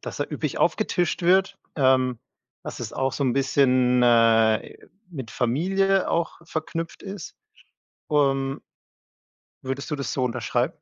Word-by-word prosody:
dass - - -7
da - - 0
üppig - - -4
aufgetischt 175 0 0
wird, 190 +3 +3 0.2
ähm, 130 -3 +2 0.5
dass - - -7
es - - -5
auch 135 -1 -1
so 140 - -3
'n 125 - +2
bisschen, 130 -2 +3
äh, 115 -2 +3 0.3
mit 135 -9 -8
Familie 190 +10 +1
auch 170 0 -1
verknüpft 165 +1 -5
ist. 195 -3 -8 0.8
Ähm 135 -1 +1 1.0
Würdest 135 +3 -5
du 150 - -1
das 140 - -4
so 130 - 0
unterschreiben? 115 - -1
135 Hz, 135 wpm, -24 LUFS, 125-165 Hz, 1.0 s, wird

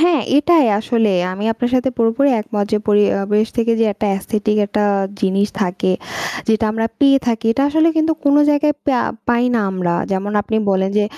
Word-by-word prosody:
হ্যাঁ 335 -3 +3 0.2
এটাই 305 -1 +4
আসলেই 220 -4 0
আমি 200 +3 -5
আপনার 245 +2 -3
সাথে 255 +1 +1
পুরোপুরি 230 +5 +2
একমত। 210 -1 -3
যে 215 - +3
পরিবেশ 205 0 +2
থেকে 235 -1 +1
যে - - +4
একটা 210 +1 -3
অ্যাসথেটিক 210 +2 -2
একটা 210 +1 -1 0.4
জিনিস 195 +1 +1
থাকে। 185 -1 -1 0.6
যেটা 220 0 +2
আমরা 225 +1 -1
পেয়ে 275 -1 +5
থাকি 230 -1 -1
এটা 275 +4 -1
আসলে 315 +2 +2
কিন্তু 320 0 +2
কোনো 285 +1 +4
জায়গায় 295 0 +1
পেয়া 260 -4 +1 0.3
পাই 240 0 +2
না 230 - +2
আমরা 180 -2 -2 0.2
যেমন 195 +2 -2
আপনি 220 - -3
বলেন 190 0 0
যে 210 - +2
225 Hz, 185 wpm, -17 LUFS, 205-275 Hz, 0.6 s, পেয়ে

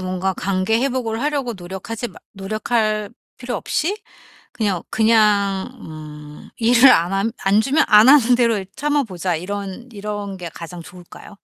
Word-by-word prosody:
뭔가 185 +1 -2
관계 195 +3 0
회복을 250 -4 -2
하려고 285 -5 -1
노력하지 190 +6 -6
마 - - -15
노력할 215 +1 -1 0.3
필요 245 -1 -5
없이 370 - -1 0.6
'그냥 200 -6 -1
그냥 210 -3 +2
음 150 -1 -11
일을 240 +3 +6
안 175 +3 +3
함 195 +3 0
안 200 +2 +4
주면 275 +6 +2
안 215 +2 +7
하는 250 -4 +6
대로 235 -3 +2
이 190 - -7
참아 290 -1 0
보자.' 180 -3 -3
이런 200 +6 -6
이런 205 -1 -5
게 175 -2 -7
가장 170 +1 -9
좋을까요? 180 +4 -13
210 Hz, 290 characters per minute, -20 LUFS, 185-235 Hz, 0.6 s, 안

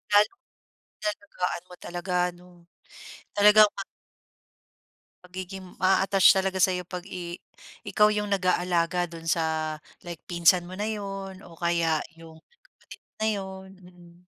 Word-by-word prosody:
lalong 210 - +4 0.6
inaalagaan 200 -4 -3
mo 180 - -11
talaga 175 +1 -5 0.2
ano, 175 -1 -19 0.7
talagang 210 +1 +7
mag 195 - -5 1.4
Pagiging, 185 0 -9
ma-a-attach 195 +1 +5
talaga 190 0 0
sa'yo 180 -1 +2
'pag 180 +1 -7
i 175 -2 -6 0.5
ikaw 210 0 +4
'yong 210 0 -1
nag-aalaga 180 -2 +1
do'n 165 -1 -10
sa 160 -1 -1 0.2
like, 170 -2 -7
pinsan 175 0 +3
mo 185 - -8
na 205 - -3
'yon 195 -3 -5
o 170 - -14
kaya 170 -2 +1 0.2
'yong 160 -1 -14 0.3
kapatid - - -16
mo - - -82
na 220 - +1
'yon. 190 -1 -7
Mm. 175 0 -18
180 Hz, 130 wpm, -27 LUFS, 175-195 Hz, 1.4 s, talagang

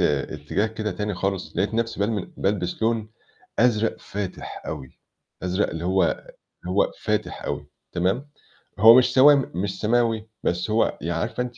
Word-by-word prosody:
اتجاه 75 +7 0
كده 110 -1 -3
تاني 105 +2 -3
خالص، 95 0 -3
لقيت 100 +4 0
نفسي 115 -2 -1
بالم 105 -2 -1
بالبس 95 0 -1
لون 110 -1 +1 0.5
أزرق 115 -2 +3
فاتح 100 -2 -6
أوي، 65 - -7 0.4
أزرق 90 +3 0
اللي 80 +1 -5
هو 95 +1 +2 0.6
اللي 90 - -4
هو 100 - +3
فاتح - - -2
أوي 75 0 -3 0.3
تمام، 95 +11 0 0.5
هو 115 +3 +9
مش 125 - +3
سوامي 140 +1 +7
مش 95 +2 -3
سماوي، 115 -1 +1 0.2
بس 90 +4 0
هو 110 +1 +2
يعني 85 +1 -1
عارفة 125 - -2
أنتِ 125 -1 -6
105 Hz, 155 wpm, -24 LUFS, 90-115 Hz, 0.6 s, هو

